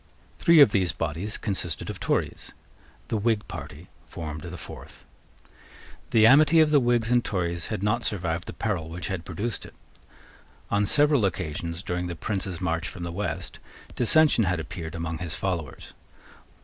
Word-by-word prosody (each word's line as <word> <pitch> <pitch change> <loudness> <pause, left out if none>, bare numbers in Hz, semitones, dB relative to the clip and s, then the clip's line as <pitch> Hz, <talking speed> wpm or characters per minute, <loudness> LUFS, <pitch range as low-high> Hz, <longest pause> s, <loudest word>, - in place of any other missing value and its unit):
Three 170 -2 +6
of 135 - +8
these 90 -5 +1
bodies 85 +5 -3
consisted 95 -6 -2
of - - -10
Tories. - - -2 0.6
The 110 - 0
Whig 110 0 0
party - - -8 0.2
formed 75 -2 -6
the 90 +2 -7
fourth. - - -11 1.0
The 110 -1 +5
amity 150 +6 +7
of 155 -1 +5
the 145 - +6
Whigs 120 -2 +1
and 120 -1 +4
Tories 85 -3 -2
had 105 -3 -4
not 105 0 +1
survived 85 -4 -1
the - - -6
peril 90 -8 -2
which 85 +2 -5
had 95 -3 -4
produced 100 +7 -4
it. - - -12 1.0
On 100 0 +2
several 145 -2 +4
occasions, 85 -1 -2
during 90 0 -2
the 85 - -5
Prince's 95 0 -3
march 85 -2 -1
from 90 - -7
the 85 - -4
West, 100 +4 -4 0.4
dissension 135 -2 +4
had 90 -2 0
appeared 80 0 -6
among 85 -1 -4
his 85 -3 -3
followers. 85 -5 -4
95 Hz, 160 wpm, -26 LUFS, 85-115 Hz, 1.0 s, of